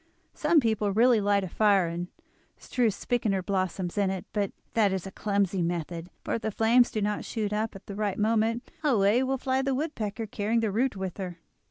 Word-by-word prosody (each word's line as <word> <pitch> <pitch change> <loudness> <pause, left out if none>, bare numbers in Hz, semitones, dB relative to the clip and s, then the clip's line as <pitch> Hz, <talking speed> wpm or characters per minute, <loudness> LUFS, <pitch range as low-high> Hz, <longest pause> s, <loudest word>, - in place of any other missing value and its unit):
Some 315 +1 +3
people 220 -5 +1
really 230 +2 +4
light 200 0 +2
a - - -3
fire 200 0 +3
and 170 +1 -4 0.5
strew 245 -3 0
spikenard 200 -3 -1
blossoms 185 -1 -1
in 200 -2 +2
it; 190 -1 -4
but 205 -2 0 0.2
that 210 -3 +3
is 190 -1 -2
a 195 - -7
clumsy 200 -3 0
method, 170 0 -3
for - - -2
if 230 - -1
the 220 - -1
flames 230 +3 +4
do 215 - -2
not 210 0 -1
shoot 210 -3 -3
up 215 0 -1
at 195 - -11
the 200 - -7
right 205 -1 -2
moment 225 +2 +1
away 230 -4 +3
will 265 +1 0
fly 260 +1 0
the 270 -1 0
woodpecker, 230 -7 -3
carrying 215 +2 0
the 220 -2 0
root 240 +3 +1
with 190 -2 -5
her." 180 -3 -5
210 Hz, 205 wpm, -28 LUFS, 195-230 Hz, 0.5 s, really